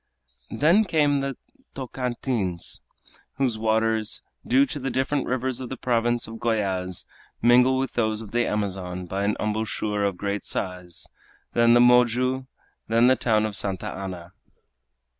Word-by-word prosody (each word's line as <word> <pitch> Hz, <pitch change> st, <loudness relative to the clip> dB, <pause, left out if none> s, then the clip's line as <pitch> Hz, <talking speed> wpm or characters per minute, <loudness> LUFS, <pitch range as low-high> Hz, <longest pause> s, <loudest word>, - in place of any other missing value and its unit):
Then 170 Hz, +9 st, +4 dB
came 150 Hz, -5 st, +2 dB
the 135 Hz, -1 st, -3 dB, 0.4 s
Tocantins, 120 Hz, -8 st, -3 dB, 0.5 s
whose 130 Hz, -5 st, 0 dB
waters, 110 Hz, 0 st, 0 dB, 0.2 s
due 135 Hz, +3 st, +4 dB
to 145 Hz, -, -5 dB
the 135 Hz, 0 st, -2 dB
different 135 Hz, +2 st, -1 dB
rivers 130 Hz, 0 st, -1 dB
of 130 Hz, -2 st, -6 dB
the 130 Hz, -, -5 dB
province 120 Hz, -1 st, +1 dB
of 115 Hz, 0 st, -8 dB
Goyaz, 95 Hz, -6 st, 0 dB, 0.3 s
mingle 125 Hz, +2 st, +5 dB
with 135 Hz, 0 st, -2 dB
those 110 Hz, -2 st, 0 dB
of 110 Hz, -3 st, -9 dB
the 120 Hz, 0 st, +1 dB
Amazon 95 Hz, -3 st, -3 dB
by 95 Hz, +3 st, -3 dB
an 105 Hz, -, +1 dB
embouchure 105 Hz, -1 st, -1 dB
of 100 Hz, -3 st, 0 dB
great 100 Hz, 0 st, -2 dB
size, 90 Hz, -2 st, -4 dB, 0.5 s
then 120 Hz, 0 st, +5 dB
the -, -, +6 dB
Moju, 125 Hz, +2 st, +4 dB, 0.4 s
then 115 Hz, +1 st, +4 dB
the 130 Hz, +1 st, +6 dB
town 110 Hz, -3 st, +2 dB
of 105 Hz, -2 st, -2 dB
Santa 95 Hz, -2 st, -1 dB
Ana. 90 Hz, -2 st, -7 dB
115 Hz, 145 wpm, -25 LUFS, 100-130 Hz, 0.5 s, the